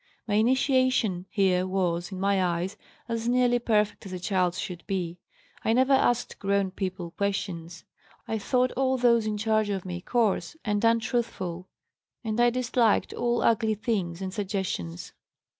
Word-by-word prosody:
My 205 - -1
initiation 255 -4 +2
here 185 -3 +2
was, 175 -2 -1
in 190 - -5
my 195 -1 +2
eyes, 180 +3 -1 0.3
as 230 0 -2
nearly 245 0 +3
perfect 215 -3 +1
as - - -9
a 180 - -4
child's 180 -1 0
should 175 -3 -5
be. 180 -3 -3 0.4
I 225 - +2
never 260 +3 +4
asked 245 -2 +1
grown 200 -1 +1
people 185 -3 -4
questions. 180 -3 -3 0.4
I 220 - -1
thought 250 +4 +1
all 260 0 +1
those 235 -3 +3
in 210 -1 -1
charge 215 0 +1
of 195 -2 -3
me 180 -1 -5
coarse 235 - 0
and 205 0 0
untruthful 220 -6 0 0.5
and 220 0 -2
I 240 0 +6
disliked 240 -2 +1
all 240 0 0
ugly 220 -1 +2
things 195 -5 -2
and 185 -1 -4
suggestions. 185 - -3
205 Hz, 155 wpm, -27 LUFS, 185-235 Hz, 0.5 s, I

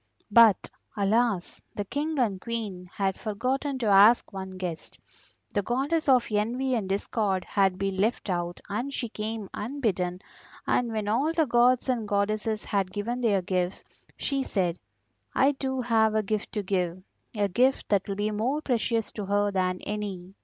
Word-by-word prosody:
But, 225 -3 +6 0.3
alas! 210 -1 +1
the 205 - -3
King 300 +7 -2
and 210 -7 0
Queen 210 -6 -4
had 195 -2 -1
forgotten 260 +6 -1
to 250 - -3
ask 205 +3 +6
one 190 -1 -6
guest. 180 -3 -5 0.6
The 205 - +2
Goddess 275 - 0
of 255 -3 +5
Envy 240 +5 0
and 215 -6 -1
Discord 195 -1 0
had 195 -2 +2
been 195 0 -2
left 215 +4 0
out, 175 -2 -2
and 240 +7 -3
she 240 -4 -3
came 215 -1 -4
unbidden, 200 -7 -2 0.4
and 240 -2 +1
when 215 -2 -2
all 255 +9 +2
the 320 -1 +3
gods 245 0 +3
and 240 -4 0
goddesses 210 +2 0
had 195 -2 -1
given 235 +5 -3
their 205 -6 +2
gifts, 180 0 -1 0.3
she 275 -1 -1
said: 180 -8 -1 0.6
'I 275 +2 +5
too 265 -2 -2
have 220 -2 +2
a 215 - +2
gift 210 +1 -2
to 210 - -1
give, 185 -2 -1 0.4
a 205 -1 +2
gift 250 +8 +2
that 200 -2 +2
will 200 - -2
be 205 +2 -1
more 235 +8 0
precious 230 -5 0
to 205 -3 -5
her 205 0 +2
than 185 -1 0
any. 195 -3 -5
210 Hz, 165 wpm, -27 LUFS, 195-240 Hz, 0.6 s, But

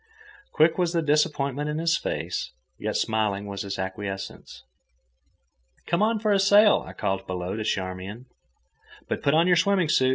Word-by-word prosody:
Quick 160 +3 +3
was 175 -1 +1
the 165 -1 +1
disappointment 150 -2 0
in 150 - -2
his 165 +1 +2
face, - - -3 0.3
yet - - -2
smiling 105 -2 0
was 100 -1 -5
the 100 -1 -5
acquiescence. 95 0 -6 1.2
"Come 170 - 0
on 220 +1 +2
for 215 0 0
a 200 - +4
sail," 205 +2 +5
I - - -9
called 95 0 -3
below 90 0 -3
to 110 - -3
Charmian. 95 +3 -4 0.8
"But - - -3
put 140 +1 +2
on 165 +2 +4
your 180 -1 +4
swimming 185 -2 +2
suit. 130 -3 +3
140 Hz, 165 wpm, -25 LUFS, -, 1.2 s, sail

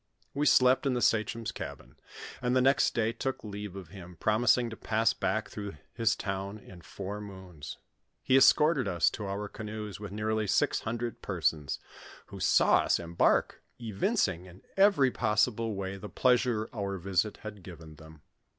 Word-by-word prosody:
We 145 +2 +1
slept 130 +2 +5
in 130 - +1
the 120 - -1
sachem's 115 +1 +1
cabin, - - -8 0.5
and 125 0 0
the - - +5
next 135 +2 +3
day 115 0 +1
took 135 +2 -4
leave 105 -2 -7
of 95 -4 -9
him, 90 -2 -11
promising 120 +2 +3
to - - -6
pass 110 0 +1
back - - -2
through 100 -4 -7 0.2
his 115 -2 +1
town 95 +1 -4
in 95 -4 -14
four 100 +4 -7
moons. 95 -7 -9 0.5
He 130 - +3
escorted 135 0 +5
us 85 -4 +2
to 105 - -6
our 100 +1 -3
canoes 105 -2 -7
with 105 -2 -7
nearly 110 +1 -1
six - - +2
hundred 120 +1 -4
persons, 80 -6 -1 0.5
who - - -9
saw - - +4
us - - +2
embark, 85 0 +1 0.2
evincing 105 - -1
in 90 +1 -15
every 195 -10 +4
possible 110 0 0
way 95 0 -4
the 105 +2 -8
pleasure 125 -3 +2
our 100 -3 -3
visit 95 +3 -1
had 105 -2 -8
given 80 -4 -12
them. 80 -1 -15
105 Hz, 165 wpm, -30 LUFS, 95-120 Hz, 0.5 s, slept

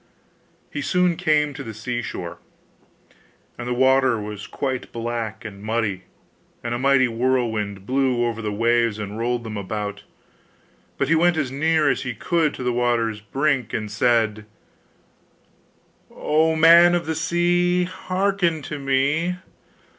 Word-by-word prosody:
He 145 - -4
soon 180 +3 +2
came 155 -4 +1
to - - -8
the 110 -1 -8
seashore; 115 -6 -5 1.2
and 120 - -7
the 125 - 0
water 130 -2 +3
was 105 -1 -7
quite 130 -2 -4
black 115 -1 -4
and 100 -2 -8
muddy, 105 -3 -2 0.6
and 120 0 -2
a 120 - -2
mighty 135 -1 +4
whirlwind 115 -5 -1
blew 130 -1 +1
over 115 -1 -3
the 105 -1 -3
waves 115 0 +1
and 105 +1 -6
rolled 120 +1 -1
them 110 -2 -6
about, 100 0 -4 1.0
but 140 - 0
he 160 - +3
went 170 +1 +3
as 140 -5 -1
near 155 +2 +2
as - - +1
he 125 -3 -4
could 160 - 0
to - - -6
the 125 -1 0
water's 120 -3 0
brink, 135 +2 -1
and 105 -2 -4
said: 110 -1 +1 1.6
'O 160 +1 +1
man 170 +2 +7
of 170 -1 -1
the 160 - -1
sea! 175 +2 +1
Hearken 185 -2 -1
to 150 - -6
me! 140 +6 +1
125 Hz, 145 wpm, -22 LUFS, 110-155 Hz, 1.6 s, man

